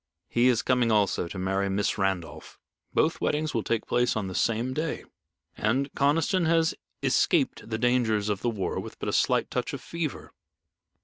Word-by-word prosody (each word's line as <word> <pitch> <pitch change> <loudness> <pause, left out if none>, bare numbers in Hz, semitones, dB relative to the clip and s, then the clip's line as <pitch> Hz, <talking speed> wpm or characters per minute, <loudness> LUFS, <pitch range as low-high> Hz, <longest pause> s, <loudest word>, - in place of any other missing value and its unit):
"He 120 +1 +3
is 120 -3 +3
coming 125 -3 +2
also 100 -4 +2
to 95 - -8
marry 95 +1 0
Miss 100 +1 0
Randolph. 95 -4 -3 0.3
Both - - +1
weddings 155 +1 0
will 115 - +1
take 115 0 -1
place 120 0 +1
on 110 -3 -1
the 95 - -5
same 115 +6 0
day, 155 +3 -3 0.5
and 130 +6 0
Conniston 160 +5 +2
has 165 0 +3 0.3
escaped - - +1
the 110 - -1
dangers 115 -3 +1
of 105 -2 -1
the 120 - +1
war 100 -6 -2
with - - -8
a - - -1
slight - - +2
touch - - -2
of - - -4
fever. 165 -4 -5
115 Hz, 175 wpm, -27 LUFS, 100-140 Hz, 0.5 s, He